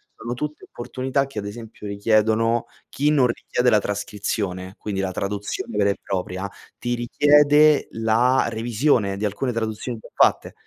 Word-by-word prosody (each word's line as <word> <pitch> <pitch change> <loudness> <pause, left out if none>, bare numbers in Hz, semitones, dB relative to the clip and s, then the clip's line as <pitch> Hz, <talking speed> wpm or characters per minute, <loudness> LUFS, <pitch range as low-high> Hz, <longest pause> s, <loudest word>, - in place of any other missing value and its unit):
sono 120 +1 -5
tutte 150 +4 -5
opportunità 130 +3 -2
che 135 -6 -6
ad 100 - -6
esempio 110 -1 -9
richiedono 110 +3 +2 0.2
chi 145 +2 0
non 140 -5 +4
richiede 125 +1 0
la 110 - +5
trascrizione, 100 -2 -3
quindi 100 -2 -3
la 95 -1 -2
traduzione 100 +3 -4
vera 100 -1 +3
e 100 - -1
propria, 95 +1 -3 0.3
ti 120 - -2
richiede 145 +4 +4
la 115 +4 +2
revisione 115 -2 +1
di 105 - -2
alcune 105 +6 -1
traduzioni 115 +1 -3
già - - -14
fatte, - - +2
115 Hz, 150 wpm, -23 LUFS, 100-125 Hz, 0.3 s, la